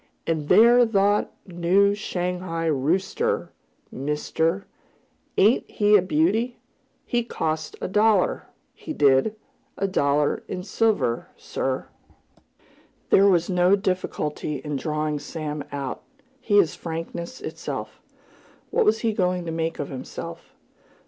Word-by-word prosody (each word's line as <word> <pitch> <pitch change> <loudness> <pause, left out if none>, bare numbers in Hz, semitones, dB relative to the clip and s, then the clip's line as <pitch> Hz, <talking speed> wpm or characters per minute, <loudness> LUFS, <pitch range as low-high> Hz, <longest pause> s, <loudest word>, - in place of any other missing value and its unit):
"And 155 -3 -2
thet 235 0 +6
thar 200 +1 +3 0.2
new 185 +3 +2
Shanghai 180 -4 -3
rooster, 160 +6 0 0.4
mister, 160 +6 -1 0.7
ain't 215 +6 +4
he 210 0 +3
a 205 - +6
beauty? 245 - +1 0.5
He 240 -2 0
cost 155 -8 -3
a - - -2
dollar, 210 0 +2 0.3
he 315 - -7
did 140 - +3 0.4
a 195 - 0
dollar 145 -5 +1
in 180 - -5
silver, 200 - 0
sir!" - - -3 1.2
There 195 +1 +6
was 175 -3 +3
no 180 +1 +4
difficulty 185 -6 -2
in 145 +2 -4
drawing 150 +1 -2
Sam 150 0 -5
out. 140 -2 -4 0.4
He 215 -5 +2
is 170 -7 +4
frankness 170 +5 -6
itself. - - -6 0.7
What 470 - +2
was 425 - +3
he 225 -2 +1
going 180 -3 0
to 165 - -3
make 165 0 -2
of 145 - -4
himself? 130 -2 -8
180 Hz, 120 wpm, -24 LUFS, 155-205 Hz, 1.2 s, thet